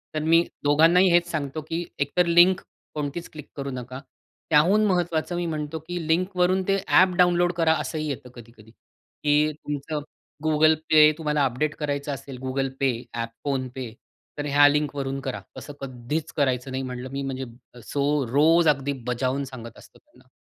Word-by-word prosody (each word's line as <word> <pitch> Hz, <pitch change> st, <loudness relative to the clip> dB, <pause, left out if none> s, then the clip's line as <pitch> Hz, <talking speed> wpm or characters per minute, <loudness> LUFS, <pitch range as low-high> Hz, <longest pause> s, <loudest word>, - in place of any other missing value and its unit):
तर 155 Hz, -, +1 dB
मी 165 Hz, +1 st, +4 dB, 0.2 s
दोघांनाही 165 Hz, +6 st, +5 dB
हेच 175 Hz, 0 st, +3 dB
सांगतो, 155 Hz, -1 st, -3 dB
की 165 Hz, +2 st, -4 dB
एकतर 145 Hz, +6 st, +1 dB
लिंक 175 Hz, +2 st, +5 dB, 0.4 s
कोणतीच 150 Hz, +3 st, -4 dB
क्लिक 150 Hz, -2 st, -10 dB
करू 140 Hz, 0 st, -4 dB
नका. 130 Hz, +1 st, -7 dB, 0.5 s
त्याहून 180 Hz, +8 st, +4 dB
महत्वाचं 175 Hz, -2 st, 0 dB
मी 175 Hz, 0 st, -2 dB
म्हणतो 155 Hz, -1 st, -4 dB
की 175 Hz, -2 st, -4 dB
लिंकवरून 180 Hz, +2 st, +1 dB
ते 195 Hz, -, +3 dB
ॲप 185 Hz, 0 st, +5 dB
डाउनलोड 175 Hz, 0 st, +3 dB
करा 165 Hz, -2 st, +3 dB
असंही 155 Hz, -1 st, -4 dB
येतं 135 Hz, -2 st, -6 dB
कधी-कधी 115 Hz, -2 st, -15 dB
की 150 Hz, +5 st, -2 dB
तुमचं 150 Hz, 0 st, -5 dB, 0.4 s
Google 155 Hz, 0 st, +4 dB, 0.2 s
Pay 155 Hz, 0 st, +8 dB
तुम्हाला 150 Hz, -3 st, +1 dB
अपडेट 145 Hz, +5 st, -1 dB
करायचं 145 Hz, -1 st, -3 dB
असेल 135 Hz, -1 st, -8 dB
Google 135 Hz, +1 st, -1 dB
Pay 125 Hz, -3 st, 0 dB
ॲप 115 Hz, -1 st, -3 dB
फोन-पे 130 Hz, -3 st, -3 dB, 0.5 s
तर 145 Hz, -, -3 dB
ह्या 145 Hz, 0 st, +6 dB
लिंक 145 Hz, 0 st, 0 dB
वरून 135 Hz, 0 st, -3 dB
करा. 135 Hz, -2 st, -5 dB, 0.2 s
असं 145 Hz, -, -8 dB
कधीच 130 Hz, +4 st, -4 dB
करायचं 130 Hz, -2 st, 0 dB
नाही 130 Hz, 0 st, -3 dB
म्हटलं 125 Hz, 0 st, -6 dB
मी 140 Hz, 0 st, -4 dB
म्हणजे 135 Hz, -1 st, -4 dB, 0.5 s
सो 140 Hz, -1 st, +1 dB, 0.3 s
रोज 160 Hz, +4 st, +4 dB
अगदी 140 Hz, 0 st, 0 dB
बजावून 130 Hz, +3 st, -1 dB
सांगत 115 Hz, -3 st, -10 dB
असतो -, -, -18 dB
त्यांना. -, -, -25 dB
145 Hz, 165 wpm, -24 LUFS, 135-165 Hz, 0.5 s, Pay